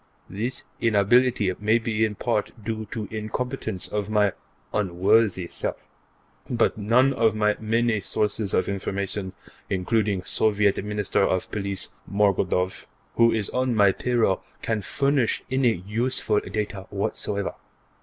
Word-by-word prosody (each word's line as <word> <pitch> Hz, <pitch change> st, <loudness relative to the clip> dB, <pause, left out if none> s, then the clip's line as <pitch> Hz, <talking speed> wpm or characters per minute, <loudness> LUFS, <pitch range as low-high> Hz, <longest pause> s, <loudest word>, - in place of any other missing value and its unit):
This 115 Hz, +6 st, -3 dB, 0.2 s
inability 115 Hz, -1 st, +3 dB
may 110 Hz, +2 st, +3 dB
be 110 Hz, -1 st, -1 dB
in 110 Hz, -1 st, 0 dB
part 110 Hz, -1 st, -1 dB
due 110 Hz, -1 st, -3 dB
to 110 Hz, -3 st, -4 dB
incompetence 110 Hz, -1 st, -4 dB
of 105 Hz, -1 st, -3 dB
my 105 Hz, -2 st, +3 dB, 0.4 s
unworthy 100 Hz, 0 st, +2 dB
self, -, -, -4 dB, 0.6 s
but 120 Hz, -2 st, +2 dB
none 120 Hz, +6 st, +3 dB
of 115 Hz, -4 st, +2 dB
my 105 Hz, -1 st, +2 dB
many 115 Hz, 0 st, +1 dB
sources 105 Hz, -1 st, -1 dB
of -, -, +1 dB
information, 100 Hz, 0 st, -3 dB, 0.4 s
including 100 Hz, 0 st, 0 dB
Soviet 105 Hz, 0 st, +2 dB
Minister 105 Hz, -1 st, 0 dB
of 95 Hz, -1 st, 0 dB
Police 100 Hz, -2 st, -2 dB, 0.2 s
Morgodoff, 95 Hz, -2 st, +1 dB, 0.3 s
who 115 Hz, 0 st, +6 dB
is 110 Hz, -3 st, -1 dB
on 130 Hz, -1 st, 0 dB
my 100 Hz, -2 st, +5 dB
payroll, 115 Hz, -4 st, +1 dB, 0.2 s
can 110 Hz, -2 st, 0 dB
furnish 140 Hz, +3 st, +1 dB
any 120 Hz, -9 st, +2 dB
useful 110 Hz, 0 st, +1 dB
data 100 Hz, -2 st, -4 dB
whatever. 100 Hz, 0 st, -2 dB
105 Hz, 125 wpm, -25 LUFS, 100-115 Hz, 0.6 s, who